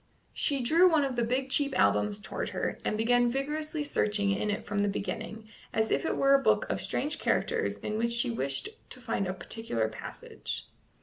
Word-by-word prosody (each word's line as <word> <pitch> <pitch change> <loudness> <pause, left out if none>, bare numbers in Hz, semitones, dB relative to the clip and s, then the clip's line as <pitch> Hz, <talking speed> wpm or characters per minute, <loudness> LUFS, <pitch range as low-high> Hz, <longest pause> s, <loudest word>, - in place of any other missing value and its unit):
She 280 -3 +1
drew 330 +9 +5
one 315 -4 +3
of 265 -2 -3
the 240 - +1
big 260 +3 -1
cheap 280 -1 +2
albums 210 0 +3
towards 205 - -4
her, - - -3
and 215 - -1
began 245 +2 +3
vigorously 300 +4 -2
searching 210 -8 +1
in 195 +2 -1
it 205 - -2
from 205 -1 -2
the 205 - +2
beginning, 215 +2 -4 0.2
as 220 0 0
if - - +1
it - - -1
were 275 0 +4
a 275 - +5
book - - +3
of - - -2
strange 300 +3 -2
characters 455 -1 0
in 215 +1 -3
which 235 +1 +1
she 235 - +1
wished 135 +3 -2 0.2
to 255 - -8
find 225 -5 -2
a 185 - -2
particular 170 - -2
passage. 110 - -7
235 Hz, 200 wpm, -29 LUFS, 205-275 Hz, 0.2 s, drew